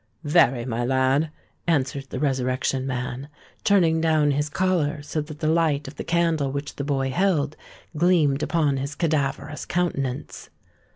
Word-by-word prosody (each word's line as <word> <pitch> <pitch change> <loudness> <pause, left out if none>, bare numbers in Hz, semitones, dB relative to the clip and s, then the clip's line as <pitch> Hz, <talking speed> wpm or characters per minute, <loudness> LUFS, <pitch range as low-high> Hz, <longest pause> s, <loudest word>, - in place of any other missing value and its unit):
"Very, 145 -6 +3
my 120 -1 -2
lad," 130 +4 +2 0.4
answered 140 -3 0
the 130 - -4
Resurrection 130 -1 0
Man, 125 +2 -4 0.3
turning 170 -5 +3
down 155 -2 +3
his 145 +1 0
collar, 160 -4 0
so 155 +1 -2
that 150 0 -9
the 155 - +1
light 155 -3 +2
of 135 - -10
the - - -4
candle 165 -5 +1
which 140 +1 -5
the 140 - -2
boy 135 -2 0
held, 165 -3 +1 0.4
gleamed 155 -4 +3
upon 150 -5 +1
his 140 +2 -4
cadaverous 150 -2 -1
countenance. 140 -8 -2
145 Hz, 150 wpm, -24 LUFS, 135-160 Hz, 0.4 s, Very